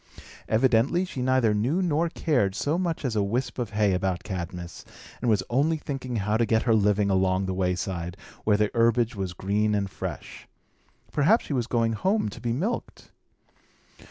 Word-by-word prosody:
Evidently 130 +9 +3
she 135 -8 -6
neither 130 -4 +3
knew 120 - +1
nor 170 -2 +1
cared 125 - 0
so 145 +9 0
much 170 -5 -2
as 120 -4 -1
a 105 - +2
wisp 120 +7 -2
of 120 -4 -2
hay 105 -2 +2
about 90 -1 -1
Cadmus, 90 -3 -6 0.4
and 120 - +1
was 105 -3 +3
only 145 +6 +1
thinking 135 -4 -5
how 105 0 0
to 115 - +2
get 110 0 +2
her 115 - +3
living 105 -1 +2
along 95 0 +2
the 95 - -2
wayside, 90 -1 -2 0.3
where 105 -1 +3
the 105 0 +1
herbage 115 0 +2
was 95 -3 -3
green 105 +4 0
and 100 -2 -1
fresh. - - -7 0.6
Perhaps 160 +11 +3
she - - -4
was 120 -4 -1
going 115 -2 +1
home 190 - 0
to - - -10
be 120 - -1
milked. 185 - -3
110 Hz, 180 wpm, -26 LUFS, 100-130 Hz, 0.6 s, Evidently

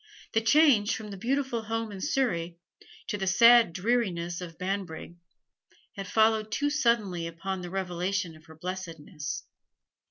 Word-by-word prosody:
The 225 - +3
change 230 -3 +4
from 215 -2 -7
the - - -6
beautiful 255 +3 -1
home 225 0 -3
in 195 -2 -8
Surrey 175 - -1 0.5
to 205 - -3
the 190 - -2
sad 230 +2 +7
dreariness 180 -4 -1
of 165 -2 -8
Banbrigg 185 -3 -4 0.8
had 195 -1 -6
followed 220 -1 +2
too 290 +4 0
suddenly 215 - +1
upon 185 +3 -5
the 175 - -6
revelation 180 -1 -2
of 155 - -18
her 160 - -14
blessedness. 165 -2 -6
195 Hz, 145 wpm, -28 LUFS, 175-225 Hz, 0.8 s, sad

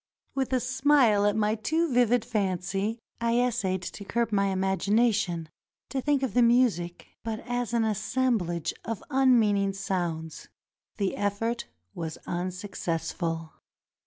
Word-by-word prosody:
With 270 -1 -1
a 260 - +3
smile 255 -5 +3
at 205 - +2
my 215 0 +2
too 315 +8 0
vivid 245 -1 +3
fancy, 195 -1 -1 0.2
I 235 +1 +2
essayed 210 -7 0
to 200 - -6
curb 235 +3 -1
my 200 -1 +2
imagination, 195 -1 +1 0.4
to 270 - -2
think 285 0 +1
of 255 -7 -1
the 245 - +4
music 235 -8 +2
but 225 -1 -3
as 245 -1 -2
an 235 -1 +2
assem 230 +3 +1
blage 170 -2 -3
of 225 -2 -4
unmeaning 220 -7 +4
sounds. 175 -5 -3 0.5
The 195 -3 0
effort 215 +4 -1 0.3
was 160 -2 -5
unsuccessful. 175 -3 -3
215 Hz, 130 wpm, -28 LUFS, 190-245 Hz, 0.5 s, the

